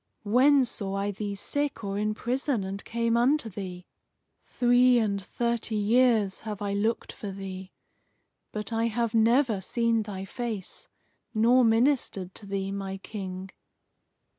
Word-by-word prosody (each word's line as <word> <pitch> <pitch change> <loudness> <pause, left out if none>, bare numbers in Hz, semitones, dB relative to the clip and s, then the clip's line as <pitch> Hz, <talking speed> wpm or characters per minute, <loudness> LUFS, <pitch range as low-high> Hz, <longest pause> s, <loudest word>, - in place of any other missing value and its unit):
When 260 +6 +5
saw 200 -4 -3
I 200 +1 -1
thee 205 0 -4
sick 285 +4 -2
or 195 -1 -3
in 215 0 0
prison, 250 -1 -1
and 195 +1 -5
came 230 0 0
unto 245 +1 +2
thee? 180 -2 -7 0.6
Three 245 0 +4
and 200 -4 0
thirty 235 +2 -2
years 215 -1 +3
have 210 -3 -6
I 200 -1 -2
looked 220 +3 -1
for 205 - -6
thee; 190 -1 -7 0.8
but 210 +1 -5
I 225 +1 +1
have 230 0 -1
never 230 -1 +3
seen 230 +3 +1
thy 195 -3 -6
face, 220 -2 -5 0.5
nor 240 +4 +5
ministered 225 -5 +2
to 205 - -10
thee, 195 0 -2
my 195 -1 -4
King." 190 -2 -7
215 Hz, 140 wpm, -27 LUFS, 195-235 Hz, 0.8 s, When